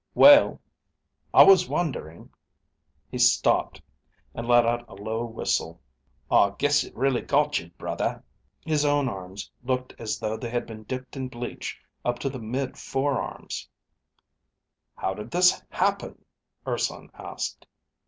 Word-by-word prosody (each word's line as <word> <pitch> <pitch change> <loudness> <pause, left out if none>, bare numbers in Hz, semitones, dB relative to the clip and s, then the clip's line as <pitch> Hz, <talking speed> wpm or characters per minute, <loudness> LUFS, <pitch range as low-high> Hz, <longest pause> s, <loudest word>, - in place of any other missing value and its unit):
"Well, 290 +1 +8 0.7
I - - +9
was 185 -2 +6
wondering 125 - -3 0.4
..." - - -46
He - - -4
stopped, - - +3 0.5
and 115 - -6
let 120 -1 +5
out 120 0 -1
a - - -11
low 110 +3 -3
whistle. 85 -7 -2 0.5
"I 100 0 +4
guess 145 0 +3
it - - -13
really 135 -3 +1
got 145 0 +1
you, 85 - -11
brother." - - -3 0.4
His 155 -2 +1
own 145 -1 +2
arms 95 -3 -7
looked 130 0 -2
as 110 -3 -3
though 110 +1 -3
they 120 - -5
had 120 0 -2
been 110 -1 -10
dipped 130 +3 -6
in 130 -1 -4
bleach 120 -1 -6 0.2
up 120 0 0
to 135 - -2
the 130 - -7
mid 125 +4 -4
forearms. 135 0 -3 1.3
"How 95 - -2
did 105 +4 -8
this 180 +4 +4
happen?" - - -1 0.4
Urson - - -3
asked. - - -6
120 Hz, 145 wpm, -26 LUFS, 110-140 Hz, 1.3 s, I